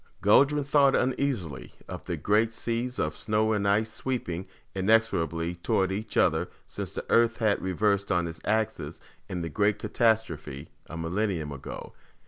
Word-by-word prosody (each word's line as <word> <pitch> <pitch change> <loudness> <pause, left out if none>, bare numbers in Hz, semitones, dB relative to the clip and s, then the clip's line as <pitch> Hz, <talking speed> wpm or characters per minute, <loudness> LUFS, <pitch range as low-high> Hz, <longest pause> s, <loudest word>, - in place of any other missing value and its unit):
Guldran 140 +8 +4
thought 140 -1 +4
uneasily 125 - -1
of - - -8
the - - -2
great 110 +2 +2
seas 120 +2 -2
of 75 -1 -1
snow 110 0 +1
and 100 -1 0
ice 110 +3 +2
sweeping 95 -10 -3 0.3
inexorably 95 -5 +1
toward 95 +2 0
each 105 +2 -4
other - - +3 0.2
since - - -6
the - - -5
Earth 115 0 +3
had 110 -3 +1
reversed 100 +2 0
on 90 -2 +2
its 80 -1 -7
axis 110 +1 -1 0.3
in 90 -2 -3
the 85 - -3
great 105 +5 +1
catastrophe 80 - 0 0.2
a 85 - -7
millennium 85 -2 -1
ago. 70 -2 -8
105 Hz, 150 wpm, -28 LUFS, 85-115 Hz, 0.3 s, Guldran